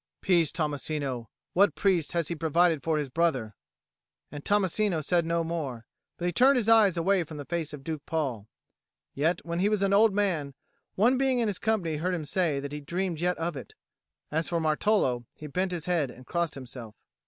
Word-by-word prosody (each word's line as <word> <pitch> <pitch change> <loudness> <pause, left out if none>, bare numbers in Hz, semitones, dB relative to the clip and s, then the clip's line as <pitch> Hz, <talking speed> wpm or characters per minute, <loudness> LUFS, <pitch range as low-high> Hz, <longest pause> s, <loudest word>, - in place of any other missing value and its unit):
"Peace, 170 -5 +3
Tommasino! 145 -6 -3 0.3
What 200 +3 +4
priest 180 -6 +1
has 170 -3 0
he - - -1
provided 165 0 +2
for 160 +1 0
his 150 -2 -1
brother?" 130 -9 0 0.8
And 145 0 -7
Tommasino 200 -3 +1
said 170 +1 +1
no 170 0 +1
more, 145 -8 -4 0.3
but 175 - -4
he 175 - +1
turned 260 +9 +5
his 230 -3 0
eyes 215 -5 +5
away 185 +2 +2
from 155 -1 -9
the 145 - -6
face 170 -1 -3
of 145 -2 -9
Duke 155 -1 -4
Paul: 130 -10 -2 0.7
yet 165 +5 0
when 170 0 -2
he 200 +3 +3
was 210 -2 +1
an 195 0 +2
old 215 +2 +6
man, 175 -9 -1 0.4
one 245 +6 +3
being 265 -2 +2
in 235 -2 +1
his 200 -3 -2
company 190 -8 0
heard 180 +4 -1
him 160 -3 -4
say 155 -2 +1
he 150 +1 -7
dreamed 175 +2 -2
yet 180 +1 0
of 165 0 -2
it. 130 - -9 0.6
As 160 +2 -1
for 170 - 0
Martolo, 155 - +1
he 155 - -10
bent 180 +6 -1
his 170 -4 -4
head 170 -7 +1
and 125 +1 -13
crossed 170 0 -1
himself. 125 -4 -9
165 Hz, 200 wpm, -28 LUFS, 150-185 Hz, 0.8 s, old